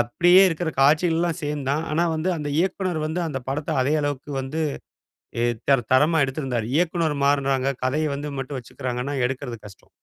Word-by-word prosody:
அப்பிடியே 175 +10 +5
இருக்கிற 165 0 -2
காட்சிகள்லாம் 165 +4 +3
சேம் 145 -2 -3
தான். 150 +3 0
ஆனா 165 +3 +2
வந்து 160 +4 -1
அந்த 150 -1 -4
இயக்குனர் 185 -2 -1
வந்து 160 +3 -2
அந்த 135 -4 -4
படத்த 150 +3 -2
அதே 140 +4 +1
அளவுக்கு 145 0 -3
வந்து 150 +5 -3 0.8
ஏ 120 - +1 0.3
தர 135 -2 +5
தரமா 155 +5 +4
எடுத்திருந்தாரு. 130 -5 -3
இயக்குனர் 165 -2 +1
மாறுனாங்க. 140 -1 +1
கதைய 150 +4 0
வந்து 145 +1 -5
மட்டும் 135 +1 -4
வச்சுக்கிறாங்கன்னா, 125 +2 -4
எடுக்கறது 125 -1 -4
கஷ்டம். 100 - -14
145 Hz, 160 wpm, -23 LUFS, 135-160 Hz, 0.8 s, அப்பிடியே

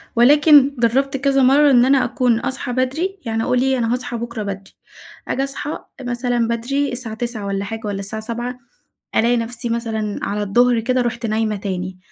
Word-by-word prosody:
ولكن 285 +2 +6
جربت 270 +4 +1
كذا 275 0 +2
مرة 280 +2 +5
إن 245 -1 +5
أنا 270 0 +4
أكون 245 -2 +1
أصحي 260 0 -4
بدري، 315 +10 -1
يعني 225 0 -1
أقول 250 0 +1
إيه 265 0 +2
أنا 230 0 0
هاصحى 245 -1 -3
بكرة 235 -2 -5
بدري، 195 -1 -7 0.5
آجي 270 - -1
أصحى 275 +2 -4 0.2
مثلًا 245 -1 -1
بدري 260 +5 -1
الساعة 235 -3 -5
09:00 235 -3 -4
والّا 200 0 -2
حاجة، 225 +2 -6
والّا 200 -1 -3
الساعة 215 +2 -5
07:00، 240 +2 -5 0.6
ألاقي 240 +2 +3
نفسي 235 +1 -4
مثلًا 225 -3 -2
على 205 +1 -2
الضهر 240 +3 +3
كده 255 +2 0
رُحت 235 0 -3
نايمة 215 -1 0
تاني، 185 -2 -4
240 Hz, 180 wpm, -20 LUFS, 225-260 Hz, 0.6 s, ولكن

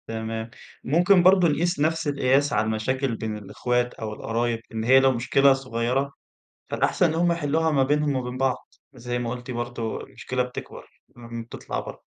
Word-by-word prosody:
تمام. 110 0 -4 0.3
ممكن 175 +5 +4
برضه 185 -1 +6
نقيس 170 +2 0
نفس 160 +1 +1
القياس 140 0 +2
على - - +2
المشاكل 115 +3 -1
بين 110 -1 -4
الأخوات 120 +4 -1
أو 110 -1 -6
القرايب، 115 +1 -1
إن 110 0 -2
هي 130 +3 +6
لو 135 0 +4
مشكلة 135 +3 +4
صغيرة، 130 +1 -1 0.6
فالأحسن - - +1
إن 160 - -1
هم 170 +1 +2
يحلّوها 160 0 +1
ما 140 -3 +3
بينهم 145 +1 +1
وما 130 - 0
بين 125 - -6
بعض. 130 -1 +1 0.4
وزي 120 -1 -4
ما 120 -1 -3
قُلتِ 125 +1 -6
برضه 120 -2 -4
المشكلة 125 0 -3
بتكبر، 125 0 -8 0.3
اهم. 115 -1 -7
بتطلع 115 - -6
برّه. - - -9
130 Hz, 175 wpm, -25 LUFS, 115-145 Hz, 0.6 s, برضه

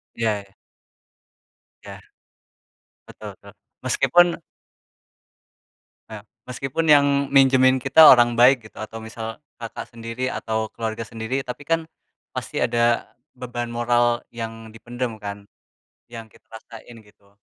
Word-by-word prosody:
Iya. 105 -4 -3 1.3
Ya - - -10 1.1
betul - - -11
betul. - - -16 0.3
Meskipun 175 0 +3 1.8
Eee, 110 -2 -9 0.3
meskipun 135 +5 -3
yang 145 -1 +7 0.3
minjemin 130 -1 +5
kita 140 +4 +7
orang 120 -1 +5
baik 125 -1 +5
gitu 110 - -16
atau 110 +1 -7
misal 110 0 -7 0.2
kakak 115 -1 -7
sendiri 115 +1 -5
atau 110 -1 -3
keluarga 115 0 -4
sendiri. 115 +5 -4
Tapi 125 +3 -7
kan, 165 0 +2 0.5
pasti - - -6
ada 120 0 +1 0.3
beban 120 -1 -5
moral 120 0 +1
yang 115 -1 -7
dipendam 120 0 -6
kan, 100 0 -7 0.6
yang 115 -1 -9
kita - - -23
rasain 115 +1 -12
gitu. 100 -1 -26
120 Hz, 115 wpm, -22 LUFS, 110-125 Hz, 1.8 s, yang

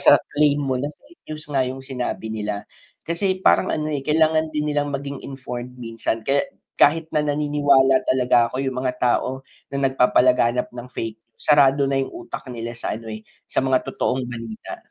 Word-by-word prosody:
sa - - +8 0.2
claim 145 0 +3
mo 130 -2 -1
na 145 - -1
fake 285 - -18
news 155 0 -6
nga 135 - +2
yung 130 +1 -7
sinabi 125 -4 -4
nila. 105 -1 -3 0.4
Kasi 185 +2 0
parang - - +4
ano, 155 0 -1
eh, 145 -3 -3
kailangan 155 0 +2
din 150 0 -1
nilang 145 -1 0
maging 140 0 -5
informed 125 -2 -6
minsan, 115 -1 -3
kaya 135 +5 +1 0.3
kahit 160 +2 +4
na 150 -1 +1
naniniwala 145 -2 +3
talaga 125 -2 +3
ako 130 - -2
yung 130 -1 -2
mga 125 - +1
tao 130 +1 +1 0.3
na 140 -1 +2
nagpapalaganap 125 -1 +3
ng 120 0 -9
fake 110 -1 -4
news, 115 - -33
sarado 140 -2 +4
na 135 - +1
yung 135 - -1
utak 345 0 -7
nila 115 0 -5
sa - - -3
ano 115 +1 -6
eh, 110 0 -7 0.2
sa - - 0
mga 130 -1 +3
totoong 130 -1 -1
balita. 115 -2 -7
135 Hz, 185 wpm, -22 LUFS, 120-145 Hz, 0.4 s, sa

